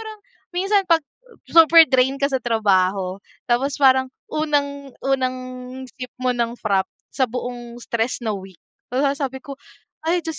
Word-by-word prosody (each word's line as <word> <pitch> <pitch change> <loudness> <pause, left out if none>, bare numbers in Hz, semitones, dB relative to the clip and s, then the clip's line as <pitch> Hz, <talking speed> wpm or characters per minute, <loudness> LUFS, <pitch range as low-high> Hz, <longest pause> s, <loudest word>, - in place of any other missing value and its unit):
pero 440 -1 -7 0.5
minsan 395 +3 +3
'pag 330 -1 +4 0.4
super 330 0 +7
drain 260 +1 +3
ka 280 +1 0
sa 265 - +1
trabaho, 195 -5 +1 0.3
tapos 265 +3 +2
parang 260 -1 +5 0.2
unang, 285 -3 -1
unang 260 -1 0 0.6
sip 250 -1 -7
mo 255 - +2
ng 235 -1 -1
frappe 195 -5 0 0.2
sa 260 -1 +1
buong 240 0 -6
stress 235 +2 -2
na 220 - 0
week. 190 -3 -8 0.4
Hala 275 +2 +2
sabi 265 -2 -4
ko, 275 -1 -9 0.5
"Ay, 345 +1 +1
Diyos 320 -2 -5
260 Hz, 150 wpm, -21 LUFS, 235-285 Hz, 0.6 s, super